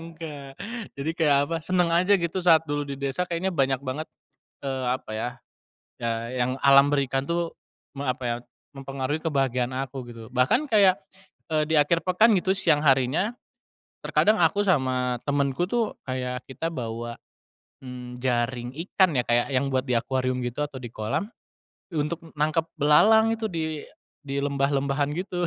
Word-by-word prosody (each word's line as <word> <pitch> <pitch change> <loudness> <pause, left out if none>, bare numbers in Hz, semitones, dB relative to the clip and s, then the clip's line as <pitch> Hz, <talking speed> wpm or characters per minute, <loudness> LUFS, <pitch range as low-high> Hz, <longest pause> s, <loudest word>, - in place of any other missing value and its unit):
enggak, 155 -4 -8 0.5
jadi 145 +4 -1
kayak 150 -5 +3
apa, 165 - -2
seneng 180 -1 +2
aja 185 +4 +4
gitu 170 +1 -2
saat 165 -2 +5
dulu 145 -1 -1
di 140 -1 -6
desa 140 +5 -1
kayaknya 175 +2 -1
banyak 135 -3 +2
banget, 145 +5 -4 0.6
eee, 130 -2 -2
apa 125 -2 -2
ya, 110 +3 -2 0.7
ya 115 +1 -2
yang 130 +1 -1
alam 140 +1 +7
berikan 135 -2 +1
tuh 170 0 -1 0.4
me 140 - -5
apa 130 - -5
ya, 120 0 0 0.4
mempengaruhi 135 +2 -3
kebahagiaan 135 -5 0 0.2
aku 135 -1 -7
gitu. 115 -1 -10
Bahkan 135 - +3
kayak, 200 -6 +5 0.6
eee, 155 - +3
di 160 - +5
akhir 165 +3 +3
pekan 210 +5 +4
gitu 185 0 +1
siang 150 -5 +3
harinya 135 - +2 0.7
terkadang 215 -4 +3
aku 200 +5 +3
sama 130 -7 +1
temenku 140 +1 0
tuh 235 -2 0
kayak 125 -1 -4
kita 165 +6 -4
bawa, 120 -2 -4 0.7
mmm, 125 -1 -9
jaring 120 0 -1 0.2
ikan 185 -6 +3
ya 125 - +3
kayak 120 0 +2
yang 135 +2 +1
buat 130 0 0
di 125 - +1
akuarium 130 +1 -1
gitu 125 +5 -2
atau 140 -2 -10
di 120 - -7
kolam, 125 - -3 0.6
untuk 155 +2 -1 0.2
nangkep 155 +2 +1
belalang 220 +10 +5
itu 225 -1 -3
di 160 -5 -3 0.4
di 140 0 -4
lembah 140 -1 +1
lembahan 140 +1 0
gitu. 180 -1 -2
140 Hz, 160 wpm, -25 LUFS, 130-165 Hz, 0.7 s, alam